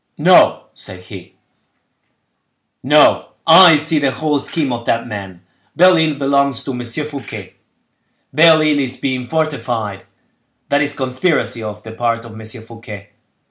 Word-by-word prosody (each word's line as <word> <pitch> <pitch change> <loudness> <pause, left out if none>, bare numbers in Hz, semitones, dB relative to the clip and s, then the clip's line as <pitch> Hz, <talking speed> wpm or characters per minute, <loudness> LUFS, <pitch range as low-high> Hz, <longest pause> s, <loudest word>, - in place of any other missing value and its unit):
"No," - - +4
said 90 -1 -9
he, 90 - -12 1.5
"no; 150 +3 +4 0.2
I 165 0 +8
see 155 +1 0
the 140 -2 +1
whole 145 +3 -1
scheme 140 -1 -3
of 120 0 -6
that 115 - -1
man. 95 -4 -8 0.3
Belle 185 +1 +5
Isle 160 -2 +1
belongs 140 -2 0
to - - -5
M. 125 -1 -5
Fouquet; 145 +3 -7 0.8
Belle 155 +1 +5
Isle 150 -2 +2
is 130 -2 -3
being 130 -2 -3
fortified: 120 -9 -3 0.6
that 145 0 +2
is 145 0 -2
a - - -20
conspiracy 130 -1 -1
on 105 -1 -7
the 110 - -9
part 115 0 -2
of 115 - -11
M. 110 0 -11 0.2
Fouquet. 115 -3 -11
135 Hz, 145 wpm, -16 LUFS, 115-150 Hz, 1.5 s, I